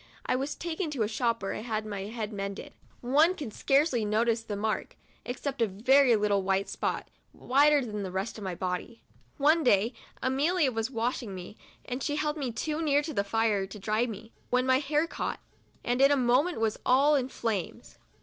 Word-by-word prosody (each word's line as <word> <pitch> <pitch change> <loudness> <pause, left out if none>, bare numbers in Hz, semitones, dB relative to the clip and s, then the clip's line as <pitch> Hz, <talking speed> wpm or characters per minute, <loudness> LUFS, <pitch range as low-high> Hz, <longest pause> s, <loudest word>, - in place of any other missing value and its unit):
I - - +1
was 275 +3 -2
taken 340 0 -3
to 270 -7 -1
a - - 0
shop 230 -1 -1
where 195 - -2
I - - -5
had 220 -2 -3
my 200 -2 -5
head 220 0 -5
mended. 200 0 -5 0.3
One 300 +9 +4
can 280 -10 -6
scarcely 270 -1 +2
notice 225 +2 +1
the 220 -2 -5
mark, 215 +2 -2 0.3
except 265 +1 -4
a - - +5
little 200 +1 -10
very 265 -2 +6
white 200 -2 +1
spot, - - -3 0.3
whiter 285 +1 +3
than 210 -2 -4
the 190 - -4
rest 190 +5 -4
of - - -8
my 185 -2 -3
body. 185 +6 -4 0.3
One 310 +3 +4
day 225 0 +3 0.3
Amelia 285 +3 +1
was 225 0 -2
washing 230 -4 -2
me, 185 +3 -9 0.3
and 250 +1 -4
she 290 - -1
held 300 0 -1
me 275 -5 -3
too 305 +7 -3
near 295 -2 +2
the 290 -10 -1
fire 210 -2 +1
to 200 - -9
dry 215 +4 0
me, 225 0 -9 0.2
when 250 +1 +2
my 260 0 +4
hair 300 +2 +1
caught, - - -4 0.4
and 245 +2 0
in 275 - +7
a 285 - +3
moment 255 +6 +2
was 225 -1 0
all 275 +4 +4
in 265 -3 +1
flames. 220 -9 -4
240 Hz, 200 wpm, -29 LUFS, 210-280 Hz, 0.4 s, in